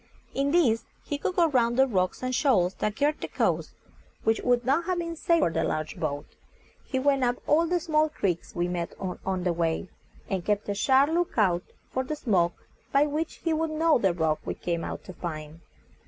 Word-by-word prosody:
In 275 +1 +1
this 280 -9 +3 0.2
he 290 - -3
could 365 - -2
go 345 -2 +5
round 240 -3 +2
the 265 - +6
rocks 185 -3 -1
and 255 0 -1
shoals 200 -10 +3
that 210 0 -1
girt 295 +3 +1
the - - -3
coast, - - -1 0.5
which 225 0 +2
would 245 -1 +2
not 280 +6 +2
have 365 -1 0
been 335 -1 -3
safe 335 +1 +2
for 170 - +2
the 165 0 0
large 155 -1 -2
boat. 145 -2 -2 0.6
He 260 - -3
went 275 0 +2
up 245 0 +2
all 325 +3 +3
the 355 +1 +1
small 310 -2 +2
creeks 185 - -2
we 175 0 0
met 175 -1 -4
with 185 -2 -4
on 190 -2 -1
the 175 -1 +1
way, 165 +2 -1 0.4
and 190 -3 -2
kept 210 +1 0
a - - +1
sharp 265 +7 +4
look 345 -3 0
out 180 -5 +3 0.3
for 260 - -1
the 305 +4 -3
smoke 185 - 0 0.3
by 280 +1 +4
which 300 +2 -3
he 330 - +1
would 320 +1 0
know 315 -2 +3
the 195 -4 +3
rock 160 -3 0
we - - -4
came 170 -1 -2
out - - -5
to 185 - -9
find. 155 -2 -6
245 Hz, 215 wpm, -27 LUFS, -, 0.6 s, the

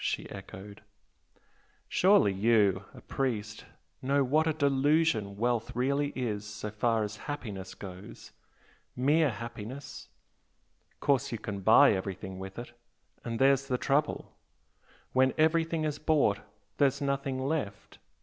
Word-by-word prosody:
she - - -2
echoed. 100 +2 -10 1.1
"Surely 190 - +4
you 100 -2 +2
a - - -13
priest 110 -6 -3 0.4
know 140 +2 +2
what 155 +5 +2
a 160 - +2
delusion 140 -7 +1
wealth 120 +1 -1
really 140 +3 0
is 110 -5 -2
so 105 0 -6
far 110 +1 +1
as 105 0 -5
happiness 100 -9 -6
goes? 95 0 -10 0.6
mere 150 +4 +3
happiness? 120 +3 -8 0.9
course 140 -1 +1
you 115 - -2
can 100 -2 -5
buy 110 +8 +6
everything 95 -1 -5
with 95 0 -8
it 120 0 -7 0.5
and 115 -1 -3
there's 135 +1 +3
the 125 -2 0
trouble! 145 +3 -1 0.8
When 130 0 +3
everything 160 0 +2
is 150 -1 -2
bought 150 -10 +2 0.4
there's 140 -1 +2
nothing 140 -1 -1
left! 130 -7 -3
125 Hz, 125 wpm, -30 LUFS, 105-140 Hz, 1.1 s, buy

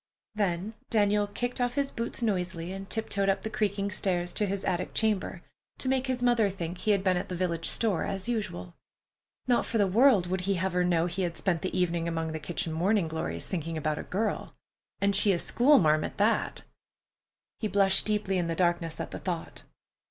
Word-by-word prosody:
Then 200 0 -1 0.2
Daniel 205 -2 +2
kicked 245 +5 -3
off 245 0 0
his 280 -1 0
boots 235 +1 -3
noisily 180 -5 -1
and 195 0 -8
tiptoed 200 -3 0
up 195 0 0
the 220 - -4
creaking 200 -1 -1
stairs 180 -3 -1
to 210 - 0
his 195 0 -3
attic 180 0 -2
chamber, 205 -5 0 0.3
to - - +1
make 265 0 +1
his 255 -1 -2
mother 240 -4 +3
think 175 -2 -5
he - - -2
had 200 -2 +3
been 185 -2 +2
at 195 +3 -4
the 180 - -3
village 170 -2 -1
store, 215 -7 +3
as 195 +2 -2
usual. 150 - -3 0.7
Not 245 -1 +2
for 230 - -2
the 205 - +4
world 215 0 +4
would 185 +1 -2
he 195 +1 0
have 185 +1 -1
her 180 0 +2
know 170 -2 +2
he 180 +2 -3
had 170 -3 -2
spent 170 -1 0
the 185 - -3
evening 170 -2 0
among 165 -1 -2
the 160 - -4
kitchen 170 +1 -3
morning 185 +2 +1
glories, 85 - -3
thinking 165 -2 -4
about 155 -1 -1
a - - -3
girl! 215 +3 -3 0.4
And 200 0 +2
she 200 0 +5
a - - +1
schoolmarm 170 - +4
at - - -5
that! 215 +3 +1 1.0
He 215 - -1
blushed 195 -1 +4
deeply 205 -3 0
in 175 - -1
the 165 - -2
darkness 170 -2 0
at - - -5
the - - -6
thought. 175 -3 -5
190 Hz, 205 wpm, -28 LUFS, 175-210 Hz, 1.0 s, she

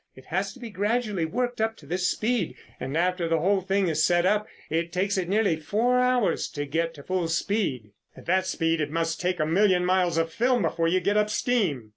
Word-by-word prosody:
It 130 - -15
has 190 +4 -2
to - - -15
be 235 -3 -8
gradually 205 -2 0
worked 245 +6 -2
up 225 0 0
to 145 - -15
this 180 +4 -1
speed, 220 -4 -1 0.2
and 135 +4 -3
after 180 0 +1
the 165 0 +2
whole 190 +4 +2
thing 195 +1 +1
is 155 -1 +1
set 175 +1 +3
up, 210 +2 +2 0.2
it 165 +2 -1
takes 190 +3 0
it 180 -2 -2
nearly 200 -5 +2
four 225 +11 +1
hours 250 -8 +2
to 145 0 -3
get 165 +3 -2
to 145 - -11
full 185 0 -1
speed." 165 - -1 0.3
"At - - -13
that 185 +1 +1
speed, 165 -1 0
it 150 - -1
must 165 +1 -2
take 180 -1 -1
a 155 - +2
million 180 +2 +3
miles 180 -2 +2
of 165 0 0
film 245 +1 +2
before 165 0 0
you 185 +2 +2
get 205 +1 +1
up 210 0 +2
steam." 190 - 0
180 Hz, 225 wpm, -26 LUFS, 165-210 Hz, 0.3 s, set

